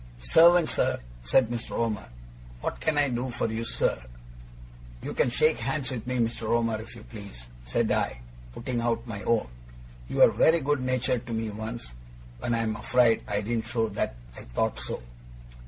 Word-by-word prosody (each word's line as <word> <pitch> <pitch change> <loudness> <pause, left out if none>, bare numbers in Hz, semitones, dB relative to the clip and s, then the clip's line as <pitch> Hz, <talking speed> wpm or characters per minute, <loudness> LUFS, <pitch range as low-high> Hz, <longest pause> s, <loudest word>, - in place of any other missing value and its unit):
'Servant, 165 - +6
sir,' - - +1 0.2
said 110 - +3
Mr. 120 -1 -4
Omer. 105 - -1 0.5
'What - - -3
can 155 -2 0
I 145 -1 +3
do 125 +1 -2
for 120 - -2
you, 110 +1 -2
sir?' 115 - 0 1.0
'You - - -4
can - - +2
shake 155 +5 +2
hands 135 +3 -1
with 125 -2 -5
me, 125 0 -1
Mr. 115 -1 -1
Omer, 115 -2 +1
if 115 - -10
you 110 - -11
please,' 100 - -10 0.2
said - - +1
I, - - 0 0.3
putting 120 - -3
out 115 0 0
my 105 -4 -6
own. 115 - +1 0.6
'You - - -4
were - - +8
very 165 +1 +4
good 145 -1 +1
natured 125 -1 0
to 115 - -4
me 110 -1 -2
once, 110 - -6 0.5
when 120 - 0
I 115 - 0
am 110 -1 -1
afraid 120 0 +3
I 105 0 0
didn't 110 +1 -2
show 115 -2 0
that 100 - -2 0.2
I - - -9
thought - - -1
so. - - -4
115 Hz, 185 wpm, -27 LUFS, 110-125 Hz, 1.0 s, were